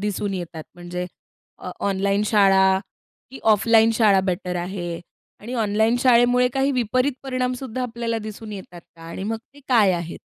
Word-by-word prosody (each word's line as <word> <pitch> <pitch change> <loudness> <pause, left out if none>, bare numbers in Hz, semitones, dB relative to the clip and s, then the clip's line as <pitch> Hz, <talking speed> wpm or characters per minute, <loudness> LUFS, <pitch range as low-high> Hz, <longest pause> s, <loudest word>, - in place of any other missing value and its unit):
दिसून 205 -1 -2
येतात? 170 -3 -6
म्हणजे 175 +1 -6 0.5
अ 180 - -7 0.2
ऑनलाइन 200 +1 0
शाळा 195 -2 +4 0.5
की 265 - -10
ऑफलाइन 225 +2 +4
शाळा 210 -4 +4
बेटर 180 -1 -2
आहे 175 -1 -4 0.4
आणि 240 +5 -7
ऑनलाइन 220 +1 +1
शाळेमुळे 245 0 +4
काही 270 +1 +1
विपरीत 255 +2 +1
परिणाम 255 -2 -1
सुद्धा 255 -1 -5
आपल्याला 230 -1 -3
दिसून 215 0 -8
येतात 185 -3 -9
का? 165 -1 -20
आणि 165 +3 -7
मग 225 +2 -2 0.2
ते 285 - -16
काय 215 -7 +4
आहेत? 170 -1 -4
210 Hz, 155 wpm, -22 LUFS, 185-240 Hz, 0.5 s, शाळा